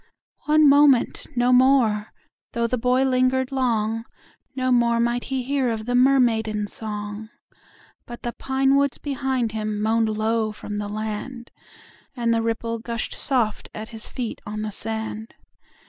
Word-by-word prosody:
One 305 Hz, 0 st, +5 dB
moment, 280 Hz, -3 st, +4 dB
no 245 Hz, +1 st, +3 dB
more: 250 Hz, -5 st, +4 dB, 0.5 s
though 235 Hz, 0 st, 0 dB
the 250 Hz, +1 st, -1 dB
boy 250 Hz, +2 st, +2 dB
linger'd 255 Hz, 0 st, +1 dB
long, 225 Hz, -4 st, 0 dB, 0.5 s
No 255 Hz, -1 st, 0 dB
more 235 Hz, -1 st, +3 dB
might 240 Hz, +1 st, 0 dB
he 265 Hz, -1 st, -2 dB
hear 270 Hz, -1 st, 0 dB
of 220 Hz, -1 st, -3 dB
the 245 Hz, -, -2 dB
mermaidens' 230 Hz, -5 st, +2 dB
song, 210 Hz, 0 st, -5 dB, 0.8 s
But 240 Hz, 0 st, -9 dB
the 240 Hz, -, -3 dB
pine 270 Hz, 0 st, +1 dB
woods 280 Hz, -1 st, +2 dB
behind 265 Hz, -4 st, -2 dB
him 215 Hz, -1 st, -3 dB
moan'd 220 Hz, +1 st, +2 dB
low 220 Hz, 0 st, 0 dB
from 210 Hz, 0 st, -6 dB
the 205 Hz, 0 st, -3 dB
land, 220 Hz, +4 st, -5 dB, 0.6 s
And 235 Hz, -2 st, +1 dB
the 230 Hz, -, +1 dB
ripple 230 Hz, 0 st, -2 dB
gush'd 230 Hz, 0 st, -4 dB
soft 235 Hz, -6 st, -1 dB
at 215 Hz, +1 st, -6 dB
his 220 Hz, -1 st, -6 dB
feet 240 Hz, -3 st, -5 dB
on 215 Hz, +1 st, -5 dB
the 215 Hz, -, -3 dB
sand. 220 Hz, +1 st, -5 dB
235 Hz, 150 wpm, -23 LUFS, 220-255 Hz, 0.8 s, One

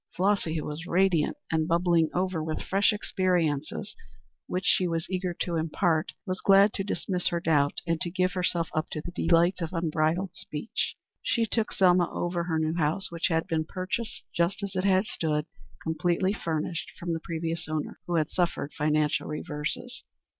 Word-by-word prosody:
Flossy, 190 Hz, -3 st, +1 dB
who 155 Hz, -, -2 dB
was 155 Hz, +3 st, -5 dB
radiant 185 Hz, -, +2 dB
and 160 Hz, -1 st, +1 dB
bubbling 170 Hz, -1 st, +3 dB
over 180 Hz, -3 st, 0 dB
with 155 Hz, 0 st, -2 dB
fresh 195 Hz, +3 st, +3 dB
experiences 180 Hz, -6 st, 0 dB, 0.5 s
which 185 Hz, +1 st, -2 dB
she 185 Hz, -, +3 dB
was 165 Hz, -1 st, -2 dB
eager 185 Hz, -1 st, -1 dB
to 170 Hz, -2 st, 0 dB
impart, 160 Hz, 0 st, +1 dB
was 185 Hz, -1 st, -3 dB
glad 200 Hz, +1 st, +6 dB
to 195 Hz, -, -2 dB
dismiss 185 Hz, -2 st, -1 dB
her 170 Hz, -, +1 dB
doubt 150 Hz, -4 st, +2 dB
and 165 Hz, 0 st, 0 dB
to 180 Hz, -, -1 dB
give 185 Hz, +1 st, +1 dB
herself 175 Hz, -2 st, 0 dB
up 155 Hz, +1 st, -1 dB
to 155 Hz, -, -3 dB
the 175 Hz, -, -6 dB
delights 175 Hz, +1 st, +3 dB
of 165 Hz, +1 st, -3 dB
unbridled 165 Hz, +2 st, 0 dB
speech. 155 Hz, +10 st, -4 dB, 0.3 s
She 230 Hz, -2 st, +1 dB
took 225 Hz, 0 st, 0 dB
Selma 180 Hz, -2 st, +4 dB
over 175 Hz, -1 st, -1 dB
her 165 Hz, -2 st, 0 dB
new 160 Hz, 0 st, +1 dB
house, 165 Hz, +4 st, 0 dB
which 170 Hz, -1 st, 0 dB
had 165 Hz, -2 st, +1 dB
been 160 Hz, -4 st, 0 dB
purchased 190 Hz, +7 st, -4 dB
just 170 Hz, +4 st, 0 dB
as 200 Hz, -1 st, -4 dB
it 190 Hz, +1 st, +3 dB
stood, 155 Hz, -6 st, -1 dB, 0.4 s
completely 175 Hz, +3 st, +1 dB
furnished, 165 Hz, -3 st, -3 dB
from 170 Hz, -1 st, -3 dB
the 165 Hz, -, -2 dB
previous 165 Hz, 0 st, -3 dB
owner, 155 Hz, -1 st, -3 dB
who 175 Hz, -, 0 dB
had 155 Hz, -3 st, +1 dB
suffered 170 Hz, -5 st, -1 dB
financial 150 Hz, 0 st, +1 dB
reverses. 150 Hz, +11 st, -4 dB
170 Hz, 175 wpm, -28 LUFS, 160-185 Hz, 0.5 s, glad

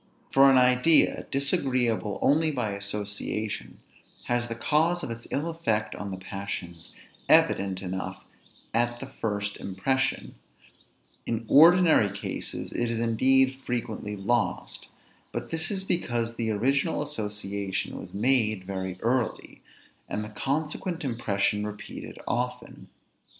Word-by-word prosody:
For 135 Hz, 0 st, +7 dB
an 135 Hz, -, +6 dB
idea, 125 Hz, +5 st, +4 dB
disagreeable 125 Hz, -6 st, 0 dB
only 155 Hz, +3 st, +4 dB
by 125 Hz, -8 st, -1 dB
association, 105 Hz, +1 st, -4 dB, 0.4 s
has 120 Hz, 0 st, 0 dB
the 115 Hz, -, -4 dB
cause 160 Hz, +8 st, +1 dB
of -, -, -4 dB
its 115 Hz, 0 st, -7 dB
ill 145 Hz, +4 st, -1 dB
effect 115 Hz, -11 st, -1 dB
on 100 Hz, -, -5 dB
the 95 Hz, -, -5 dB
passions 95 Hz, -3 st, -6 dB, 0.4 s
evident 95 Hz, -1 st, +4 dB
enough 95 Hz, 0 st, -4 dB, 0.5 s
at 120 Hz, +1 st, +1 dB
the -, -, -6 dB
first 100 Hz, -2 st, -3 dB
impression; 130 Hz, +8 st, -1 dB, 0.9 s
in 115 Hz, 0 st, -2 dB
ordinary 160 Hz, -, +7 dB
cases, 100 Hz, 0 st, -5 dB
it 120 Hz, -1 st, -1 dB
is 115 Hz, -, -1 dB
indeed 130 Hz, +3 st, +3 dB
frequently 110 Hz, -3 st, -3 dB
lost; 100 Hz, -2 st, -1 dB, 0.4 s
but -, -, -5 dB
this 165 Hz, +2 st, -1 dB
is 195 Hz, -2 st, -2 dB
because 120 Hz, -11 st, -1 dB
the 115 Hz, -1 st, -1 dB
original 135 Hz, +7 st, +1 dB
association 105 Hz, -7 st, -4 dB
was -, -, -9 dB
made 110 Hz, -3 st, +1 dB
very 95 Hz, -1 st, -4 dB
early, 120 Hz, 0 st, -1 dB, 0.5 s
and 105 Hz, -, -2 dB
the -, -, -8 dB
consequent 150 Hz, -, -2 dB
impression 105 Hz, -4 st, 0 dB
repeated 105 Hz, 0 st, -7 dB
often. 125 Hz, -1 st, -3 dB
115 Hz, 125 wpm, -27 LUFS, 105-135 Hz, 0.9 s, For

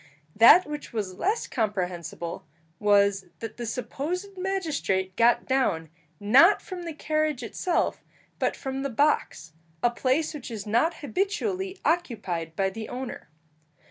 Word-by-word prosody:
That 235 Hz, -, +8 dB
which 295 Hz, 0 st, -7 dB
was 200 Hz, -5 st, -4 dB
less 425 Hz, +5 st, 0 dB
comprehensible 180 Hz, -, -3 dB, 0.4 s
was, 200 Hz, -2 st, +3 dB
that 225 Hz, -1 st, -7 dB
the 240 Hz, -1 st, -4 dB
supposed 305 Hz, -, -4 dB
magistrate 315 Hz, -, -1 dB
got 235 Hz, +1 st, +4 dB
down, 175 Hz, -, 0 dB, 0.3 s
not 265 Hz, -, +6 dB
from 365 Hz, -3 st, -8 dB
the 330 Hz, -, -4 dB
carriage 310 Hz, -4 st, -1 dB
itself, 340 Hz, -, -1 dB, 0.4 s
but -, -, 0 dB
from 265 Hz, 0 st, -4 dB
the 275 Hz, -, -2 dB
box, 255 Hz, -, 0 dB, 0.3 s
a 240 Hz, -, +4 dB
place 265 Hz, +7 st, 0 dB
which 290 Hz, -5 st, -7 dB
is 220 Hz, -4 st, -6 dB
not 235 Hz, +11 st, +1 dB
habitually 385 Hz, +1 st, -2 dB
occupied 205 Hz, -, -1 dB
by 195 Hz, +1 st, +1 dB
the 220 Hz, +2 st, -7 dB
owner. 255 Hz, -, -6 dB
250 Hz, 135 wpm, -26 LUFS, 205-325 Hz, 0.4 s, That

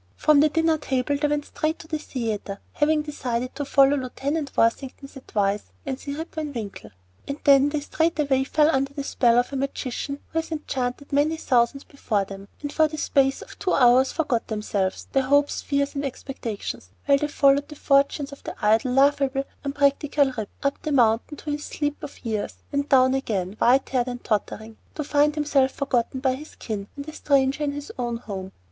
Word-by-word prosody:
From 305 Hz, -2 st, +4 dB
the 305 Hz, +1 st, +5 dB
dinner 325 Hz, 0 st, +2 dB
table 265 Hz, 0 st, 0 dB
they 295 Hz, +1 st, +1 dB
went 295 Hz, 0 st, -1 dB
straight 310 Hz, +1 st, -2 dB
to 320 Hz, -, -12 dB
the 310 Hz, -1 st, -2 dB
theatre, 220 Hz, -8 st, -4 dB, 0.2 s
having 300 Hz, +1 st, +2 dB
decided 255 Hz, -4 st, -3 dB
to 290 Hz, -, -4 dB
follow 275 Hz, 0 st, +4 dB
Lieut. 255 Hz, -3 st, -5 dB, 0.4 s
Worthington's 265 Hz, +4 st, 0 dB
advice 205 Hz, -6 st, -1 dB, 0.2 s
and 265 Hz, -1 st, -3 dB
see 280 Hz, -1 st, -5 dB
"Rip 320 Hz, +3 st, -6 dB
Van 305 Hz, -2 st, -4 dB
Winkle." 215 Hz, -5 st, -6 dB, 0.4 s
And 280 Hz, -, -3 dB
then 280 Hz, 0 st, +6 dB
they 295 Hz, 0 st, -2 dB
straightway 300 Hz, -3 st, +1 dB
fell 300 Hz, +3 st, +3 dB
under 275 Hz, -1 st, 0 dB
the 280 Hz, -, -3 dB
spell 240 Hz, -4 st, +3 dB
of 245 Hz, +3 st, +1 dB
a -, -, -1 dB
magician 275 Hz, 0 st, -3 dB
who 325 Hz, -, 0 dB
has 325 Hz, -, -6 dB
enchanted 280 Hz, -3 st, -3 dB
many 300 Hz, +3 st, +2 dB
thousands 255 Hz, -1 st, +1 dB
before 215 Hz, -8 st, -2 dB
them, 195 Hz, 0 st, -10 dB, 0.2 s
and 290 Hz, -, -4 dB
for 315 Hz, -1 st, +4 dB
the 310 Hz, 0 st, -7 dB
space 275 Hz, -2 st, +1 dB
of -, -, -14 dB
two 380 Hz, -2 st, 0 dB
hours 255 Hz, +1 st, +5 dB
forgot 290 Hz, -8 st, -1 dB
themselves, 205 Hz, -3 st, -2 dB
their 270 Hz, -, +3 dB
hopes 285 Hz, +2 st, +2 dB
and -, -, -20 dB
fears 280 Hz, 0 st, +1 dB
and 280 Hz, -1 st, -3 dB
expectations, 245 Hz, -, -5 dB, 0.2 s
while 280 Hz, -1 st, +4 dB
they 295 Hz, -, 0 dB
followed 285 Hz, -1 st, +3 dB
the 300 Hz, -, -10 dB
fortunes 280 Hz, 0 st, +2 dB
of 280 Hz, -, -12 dB
the -, -, -6 dB
idle, 220 Hz, +5 st, +3 dB
lovable, 275 Hz, 0 st, +3 dB, 0.2 s
unpractical 280 Hz, 0 st, +2 dB
Rip, 220 Hz, -3 st, -4 dB
up 280 Hz, 0 st, -1 dB
the 305 Hz, -, -3 dB
mountain 240 Hz, +2 st, +2 dB
to 300 Hz, -, -5 dB
his 295 Hz, 0 st, -3 dB
sleep 290 Hz, -1 st, -3 dB
of 285 Hz, -, -10 dB
years, 215 Hz, -3 st, -2 dB, 0.2 s
and 280 Hz, 0 st, -1 dB
down 260 Hz, -1 st, +5 dB
again, 205 Hz, -8 st, -2 dB
white 260 Hz, +3 st, +4 dB
haired 250 Hz, -2 st, 0 dB
and 245 Hz, -1 st, -5 dB
tottering, 220 Hz, +1 st, -2 dB, 0.2 s
to 305 Hz, -, -2 dB
find 295 Hz, +1 st, +2 dB
himself 290 Hz, -3 st, +2 dB
forgotten 260 Hz, -2 st, -1 dB
by 260 Hz, -1 st, +2 dB
his 300 Hz, +4 st, -9 dB
kin 205 Hz, -3 st, -5 dB
and 285 Hz, 0 st, -7 dB
a 310 Hz, -, -7 dB
stranger 275 Hz, -1 st, +1 dB
in 285 Hz, -1 st, -1 dB
his 290 Hz, 0 st, -7 dB
own 240 Hz, -1 st, -1 dB
home. 190 Hz, -5 st, -7 dB
275 Hz, 200 wpm, -24 LUFS, 245-290 Hz, 0.4 s, then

